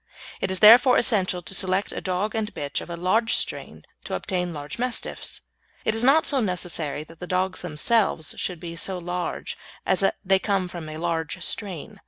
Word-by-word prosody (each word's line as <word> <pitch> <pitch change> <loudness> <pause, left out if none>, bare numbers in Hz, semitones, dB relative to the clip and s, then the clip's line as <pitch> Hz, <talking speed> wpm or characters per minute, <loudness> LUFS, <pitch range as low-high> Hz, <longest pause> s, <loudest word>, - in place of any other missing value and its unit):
It - - 0
is 190 0 +1
therefore 240 +4 +8
essential 185 -6 +2
to 160 - -4
select 190 0 +1
a - - -5
dog 190 +3 -2
and 220 -1 -2
bitch 145 -1 -3
of - - -10
a 170 - -5
large 220 +6 +2
strain - - -3 0.2
to - - -3
obtain 180 -2 -2
large 145 +4 -7
Mastiffs. 250 -1 -3 0.4
It 220 - +2
is 225 +1 +1
not 280 +5 +5
so 280 - +3
necessary 170 - -2
that 165 +1 -16
the 180 - -7
dogs 185 +1 -1
themselves 175 0 +1
should 180 -3 -2
be 170 0 -7
so 185 +3 -1
large 175 0 -4 0.3
as 185 - +2
that 195 - +2
they 190 0 +4
come 195 -2 0
from 170 -3 -8
a 155 - -7
large 165 -1 -2
strain. 190 -8 -3
185 Hz, 195 wpm, -24 LUFS, 170-210 Hz, 0.4 s, therefore